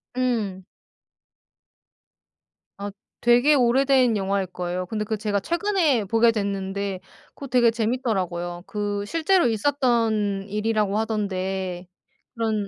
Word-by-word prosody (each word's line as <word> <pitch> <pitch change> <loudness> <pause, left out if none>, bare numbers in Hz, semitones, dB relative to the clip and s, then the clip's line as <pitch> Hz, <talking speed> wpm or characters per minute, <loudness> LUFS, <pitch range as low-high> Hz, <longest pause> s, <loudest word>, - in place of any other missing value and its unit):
음. 225 -7 -1 2.2
아 200 0 -5 0.3
되게 245 +5 +5
오래된 255 -2 +3
영화일 195 -1 -1
거예요. 180 0 -4
근데 215 +2 -2
그 220 +1 -2
제가 205 -1 -1
최근에 335 - +1
보게 230 +3 +4
됐는데 200 -2 -3 0.4
그거 280 - -8
되게 245 -2 +4
재밌더라고요. 195 -7 -2
그 205 -1 -3
실제로 330 - +2
있었던 225 -5 +1
일이라고 210 -1 0
하던데 190 -4 -2 0.5
그런 220 -4 -1
215 Hz, 245 characters per minute, -24 LUFS, 195-245 Hz, 2.2 s, 되게